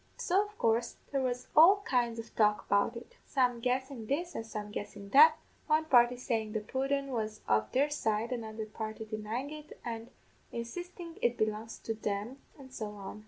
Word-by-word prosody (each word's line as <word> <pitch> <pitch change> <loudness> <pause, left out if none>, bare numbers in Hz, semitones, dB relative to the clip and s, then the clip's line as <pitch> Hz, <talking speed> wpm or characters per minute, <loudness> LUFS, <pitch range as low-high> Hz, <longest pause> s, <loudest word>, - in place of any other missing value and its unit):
So, 390 +4 +2
of 415 0 -18
coorse, 230 +1 +1 0.2
there 275 -1 +1
was 250 -1 -2
all 375 +6 +8
kinds 240 -3 +1
of 230 0 -8
talk 210 -1 +3
about 200 +4 +2
it 240 - -12
some 250 -3 +1
guessin' 255 -1 -2
this, 340 +7 -1
and - - -4
some 210 -2 -6
guessin' 205 -1 -6
that 310 +6 +8 0.3
one 310 0 +3
party 245 -4 +5
sayin' 225 -4 -2
the 215 - 0
pudden 270 +5 -1
was 215 -3 -3
of 110 0 +2
there 285 +3 +2
side, 225 -4 0
another 220 -2 -4
party 220 0 -6
denyin' 220 +6 -4
it, 305 0 -10
an' 230 -1 -5 0.4
insistin' 335 +8 -6
it 240 0 +2
belonged 215 +1 -1
to 225 - -1
them, 215 +4 -3 0.2
an' 265 -2 -13
so 215 -4 -5
on. 200 +1 -8
235 Hz, 180 wpm, -32 LUFS, 215-275 Hz, 0.4 s, all